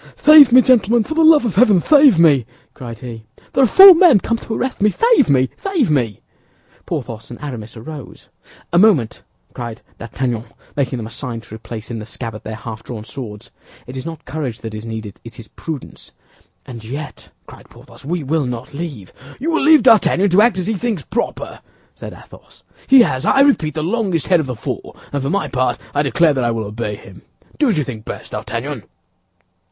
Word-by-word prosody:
"Save 300 -4 +7
me, 255 +1 +7
gentlemen, 235 -2 +3
for 315 - -5
the 325 +1 +2
love 315 -4 +5
of 220 - -2
heaven, 205 -2 +4
save 280 - +5
me!" 145 -8 +4 0.3
cried 115 -3 -9
he. 115 -2 -9 0.3
"There 270 - +3
are - - +5
four 385 - +9
men 330 - +5
come 230 +4 -2
to 225 - -7
arrest 255 -4 -4
me. 210 - +4
Save 460 - +2
me! 130 -2 +2
Save 345 - -1
me!" 120 -8 -1 0.7
Porthos 115 -1 -6
and 120 - -10
Aramis 120 -6 -8
arose. 140 +4 -11 0.5
"A 175 - +4
moment," 180 - +2 0.3
cried 120 -2 -8 0.2
D'Artagnan, 120 0 -4 0.3
making 130 -3 -2
them 115 - -6
a 110 - -10
sign 125 -3 -6
to 110 - -15
replace 110 0 -9
in 115 - -5
the 105 - -9
scabbard 115 -1 -7
their 110 - -6
half 110 0 -8
drawn 115 -2 -8
swords. 110 -4 -9 0.3
"It 125 - -10
is 130 - -6
not 165 -1 -9
courage 130 -4 -5
that 110 -1 -7
is 110 +1 -7
needed; 110 -3 -7
it 115 0 -12
is 115 - -12
prudence." 155 -5 -9 0.5
"And 115 -3 -10
yet," 140 +6 -8 0.2
cried - - -16
Porthos, - - -17
"we 165 +3 -3
will 145 0 -1
not 125 +3 -7
leave—" 140 - -7 0.3
"You 320 +5 -2
will 325 - 0
leave 310 +1 +5
D'Artagnan 200 -3 +4
to 190 +4 +5
act 230 -3 +3
as 185 - -2
he 220 - -1
thinks 215 - -3
proper," 235 - -4 0.3
said - - -9
Athos. - - -17 0.2
"He 265 -1 +7
has, 130 - 0
I 270 - +3
repeat, 175 - +2
the 155 - -2
longest 185 -3 -1
head 180 -3 +3
of 155 - -3
the 125 - -4
four, - - -7 0.2
and 140 - -2
for 135 - -3
my 200 +5 -1
part 130 -1 -1 0.2
I 145 - +1
declare 150 +3 +2
that 130 -2 -2
I 120 - +1
will 115 -2 -3
obey 105 0 -5
him. 95 -2 -15 0.4
Do 295 - +3
as 205 - 0
you 150 - +1
think 115 -5 -8
best, - - -8
D'Artagnan." 115 -2 -5
145 Hz, 205 wpm, -18 LUFS, -, 0.7 s, four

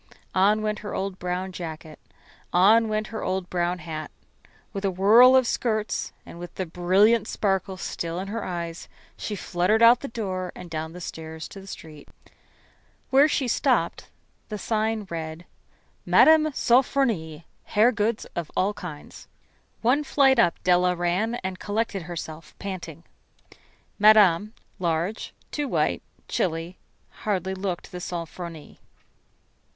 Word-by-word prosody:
On 205 +3 +3
went 215 0 -1
her 205 - -6
old 190 -1 -3
brown 180 +1 -3
jacket; 160 -3 -8 0.5
on 215 +5 +5
went 215 0 -1
her 220 - -4
old 185 -1 -2
brown 175 0 0
hat. 155 -3 -6 0.6
With 195 -1 -4
a 195 - +2
whirl 220 +8 +7
of 260 -1 +5
skirts 215 -2 -1
and 170 - -11
with 175 0 -9
the 185 - -2
brilliant 195 +6 +3
sparkle 195 -2 -1
still 170 -1 -4
in 190 +2 -4
her 220 +1 -4
eyes, 170 -2 -5 0.3
she 210 - -4
fluttered 190 +4 +1
out 235 +2 +8
the 280 - -6
door 185 -6 -4
and 180 -2 -10
down 160 0 -4
the 180 - -9
stairs 160 -1 -7
to 195 - -10
the 195 - -14
street. 155 -5 -10 1.0
Where 275 +3 +6
she 280 -3 0
stopped - - 0 0.4
the 210 - -4
sign 220 0 -1
read: 160 0 -5 0.6
"Mme. 315 -1 +6
Sofronie, 235 - +1 0.2
Hair 220 +4 +4
Goods 215 0 -1
of 170 -3 -3
All 195 +3 +2
Kinds." 165 -7 -9 0.6
One 260 +6 +3
flight 270 -3 +4
up 175 -7 +4
Della 180 0 +3
ran, 180 +7 0
and 185 0 -4
collected 210 -1 -2
herself, 165 -1 -8
panting. 175 -5 -7 1.0
Madame, 210 -1 +5 0.2
large, 175 +4 -1 0.2
too 295 -1 -2
white, - - 0 0.3
chilly, 165 +1 -2 0.4
hardly 190 -3 -1
looked 190 -2 -4
the 180 - -6
"Sofronie." 170 -2 -7
190 Hz, 140 wpm, -25 LUFS, 175-215 Hz, 1.0 s, out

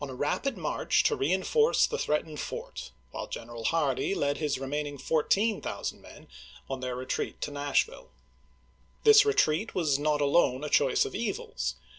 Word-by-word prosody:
a 135 -2 -5
rapid 200 - -1
march 155 -4 +1
to - - +2
reenforce 190 - +2
the 460 - -3
threatened 150 0 -1
fort, - - -6 0.2
while - - -5
General 115 -1 -7
Hardee 155 - +1
led 145 -4 0
his 150 -4 -1
remaining 145 +2 -3
14,000 195 - 0
men - - -14 0.4
on 135 -1 -4
their 125 -1 -3
retreat 130 +1 -3
to - - -3
Nashville. 145 -1 -1 0.9
This 435 -1 +8
retreat 220 - +1
was 150 -6 +1
not 150 0 +1
alone 140 -2 +2
a 150 - -3
choice - - +3
of - - -6
evils. 65 -1 -3
150 Hz, 150 wpm, -29 LUFS, 135-180 Hz, 0.9 s, This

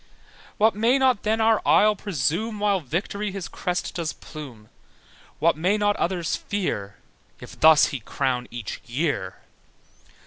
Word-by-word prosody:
What 220 +1 +4
may 230 +5 +3
not 260 -5 +2
then 220 +1 0
our 220 -1 +3
isle 210 0 +4
presume 200 - -2
While 205 -2 +2
Victory 190 +7 -3
his 195 -2 -5
crest 180 0 -3
does 170 -3 -3
plume? 130 -9 -11 0.7
What 165 +3 +3
may 180 +7 +1
not 205 -1 +2
others 175 -2 -1
fear 105 - -3 0.4
If - - -12
thus 155 -1 +6
he 140 - -3
crowns 125 +2 -2
each 120 -3 -6
year? 125 - -2
180 Hz, 140 wpm, -24 LUFS, 140-210 Hz, 0.7 s, thus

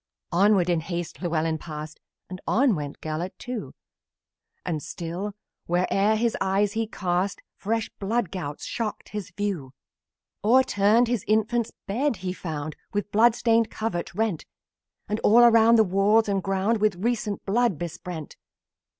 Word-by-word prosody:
Onward 190 0 +4
in 175 -2 +2
haste 170 +1 -5
Llewellyn 160 -2 0
passed, 155 -1 -8 0.3
And 185 0 -8
on 255 0 +3
went 145 -4 -5
Gelert, 160 +4 -4
too, 245 -3 -6 0.9
And 160 -4 -2
still, 170 +6 -5 0.3
where'er 195 +4 +2
his 230 +1 +1
eyes 200 +2 +1
were 225 0 0
cast, 185 -2 -1 0.2
Fresh 225 +2 -2
blood 210 -1 -1
gouts 150 -6 -5
shocked 225 -3 -4
his 210 -3 -5
view. 185 -11 -3 0.7
O'erturned 230 -1 +4
his 235 -5 -1
infant's 220 +2 +1
bed 245 +7 0
he 180 - -1
found, 155 -4 -5 0.2
The 205 0 +1
blood 225 +2 +5
stained 230 -2 +2
covert 215 -6 -3
rent; 215 -6 -1 0.6
And 210 +1 -1
all 230 +2 +6
around, 230 -1 +7
the 220 - +6
walls 205 +3 +3
and 195 -1 0
ground, 195 +4 0
With 210 -3 +3
recent 215 +1 -2
blood 225 -2 +2
besprent. 170 -1 -6
200 Hz, 140 wpm, -25 LUFS, 175-225 Hz, 0.9 s, around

